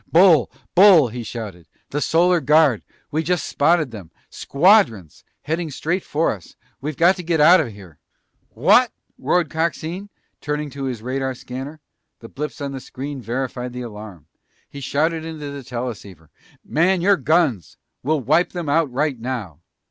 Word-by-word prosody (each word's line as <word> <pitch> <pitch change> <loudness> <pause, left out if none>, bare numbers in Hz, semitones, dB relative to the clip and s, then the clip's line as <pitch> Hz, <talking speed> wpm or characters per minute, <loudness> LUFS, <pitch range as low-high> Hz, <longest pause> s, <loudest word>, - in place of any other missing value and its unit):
"Bull! 165 -6 +5 0.2
Bull!" 180 -8 +7
he 120 +2 -6
shouted. 105 -7 -8 0.2
"The 145 - -2
Solar 175 +2 +3
Guard! 150 -7 +4 0.3
We 155 - 0
just 175 -1 -1
spotted 155 -2 +2
them! 100 -7 -10 0.2
Squadrons! 140 - +2 0.2
Heading 160 +2 -2
straight 170 +6 -2
for 155 +3 0
us! 95 -6 -10 0.3
We've 150 +1 -4
got 180 +3 +4
to 180 - -6
get 165 -1 0
out 170 +4 +7
of 150 - -3
here!" 100 -8 -13 0.5
"What?" - - +4 0.3
roared 175 -4 +1
Coxine, 170 +4 -3 0.3
turning 150 0 -3
to 140 0 -5
his 120 -4 -4
radar 130 +1 -2
scanner. 135 +5 -8 0.4
The 115 - -12
blips 150 +2 -6
on 140 -1 -3
the 135 - -6
screen 135 +2 -7
verified 125 +1 -4
the 125 0 -5
alarm. 105 -8 -10 0.4
He 140 - -10
shouted 160 +5 0
into 155 -3 -6
the 140 0 -7
teleceiver, 110 -10 -7 0.3
"Man 175 +3 +2
your 200 +3 +4
guns! 155 - 0 0.2
We'll 150 +2 0
wipe 155 +8 +2
them 175 -4 -4
out 155 -1 +2
right 135 0 -1
now!" 115 - -5
145 Hz, 160 wpm, -21 LUFS, 120-165 Hz, 0.5 s, Bull